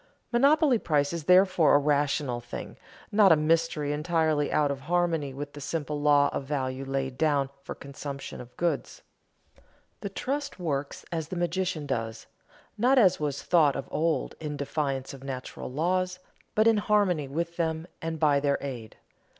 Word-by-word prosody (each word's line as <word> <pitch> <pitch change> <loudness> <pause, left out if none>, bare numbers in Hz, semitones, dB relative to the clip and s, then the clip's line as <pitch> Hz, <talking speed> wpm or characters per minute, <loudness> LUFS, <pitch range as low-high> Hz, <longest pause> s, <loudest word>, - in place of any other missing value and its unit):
Monopoly 275 +1 +4
price 145 -3 +1
is 165 -3 -4
therefore 180 -4 +5
a - - +8
rational 145 -3 +1
thing, 120 - -7 0.4
not 205 -2 +6
a - - +8
mystery 155 -1 +1
entirely 155 -1 +1
out 145 -2 +2
of 140 - -4
harmony 165 -1 0
with 145 +2 -7
the 145 - -9
simple 145 0 -3
law 145 -1 +5
of - - -2
value 135 -1 -3
laid 135 -1 -3
down 145 -3 +2
for - - -7
consumption 140 -1 -7
goods. 170 -6 -2 1.0
The 200 - -5
trust 280 +8 -3
works 145 -5 -3
as 160 -3 -3
the 185 - -6
magician 175 -2 -1
does, 115 -4 -3 0.5
not 255 +4 +4
as 190 -7 +5
was 145 -2 -2
thought 155 -6 +4
of 135 - -4
old, 160 +1 0
in 150 -2 -4
defiance 140 -2 -2
of 135 -1 -11
natural 130 -1 -6
laws, 180 +5 0 0.4
but 215 - +4
in 225 -1 +5
harmony 205 -8 +2
with 170 +4 -3
them 160 -1 -1 0.2
and 160 -1 -4
by 145 -2 +4
their 140 0 +1
aid. 120 -6 -7
150 Hz, 160 wpm, -27 LUFS, 140-175 Hz, 1.0 s, a